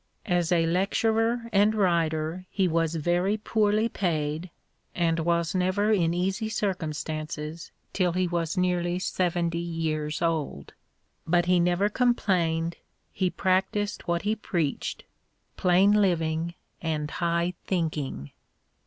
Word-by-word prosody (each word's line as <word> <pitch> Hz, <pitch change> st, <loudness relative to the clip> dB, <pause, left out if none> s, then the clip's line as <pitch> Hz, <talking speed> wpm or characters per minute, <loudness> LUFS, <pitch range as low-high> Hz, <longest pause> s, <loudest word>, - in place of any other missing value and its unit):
As 175 Hz, -3 st, +1 dB
a 170 Hz, -2 st, +3 dB
lecturer 225 Hz, +6 st, +1 dB
and 205 Hz, +2 st, +4 dB
writer 170 Hz, -2 st, 0 dB
he 195 Hz, -2 st, +1 dB
was 165 Hz, -1 st, 0 dB
very 175 Hz, +6 st, +1 dB
poorly 215 Hz, 0 st, +1 dB
paid, 160 Hz, -4 st, -2 dB, 0.5 s
and 165 Hz, -1 st, +1 dB
was 170 Hz, 0 st, +1 dB
never 185 Hz, +3 st, +1 dB
in 175 Hz, -6 st, +3 dB
easy 190 Hz, +5 st, -1 dB
circum 185 Hz, -7 st, -1 dB
stances 155 Hz, +2 st, -5 dB, 0.2 s
till 180 Hz, -3 st, +1 dB
he 185 Hz, 0 st, +1 dB
was 170 Hz, +1 st, -2 dB
nearly 180 Hz, -1 st, +1 dB
seventy 175 Hz, -2 st, 0 dB
years 160 Hz, -3 st, -2 dB
old; 155 Hz, -, -2 dB, 0.5 s
but 175 Hz, +1 st, +3 dB
he 180 Hz, 0 st, +3 dB
never 175 Hz, +3 st, +2 dB
complained, 175 Hz, -8 st, +1 dB, 0.3 s
he 185 Hz, -1 st, 0 dB
practised 190 Hz, +3 st, 0 dB
what 170 Hz, 0 st, 0 dB
he 210 Hz, +2 st, +1 dB
preached: 170 Hz, -9 st, -2 dB, 0.3 s
" -, -, -46 dB
plain 185 Hz, +3 st, +4 dB
living 170 Hz, -4 st, +1 dB, 0.3 s
and 155 Hz, -2 st, -2 dB
high 170 Hz, +1 st, 0 dB
thinking." 150 Hz, -, -2 dB
175 Hz, 125 wpm, -27 LUFS, 165-190 Hz, 0.5 s, and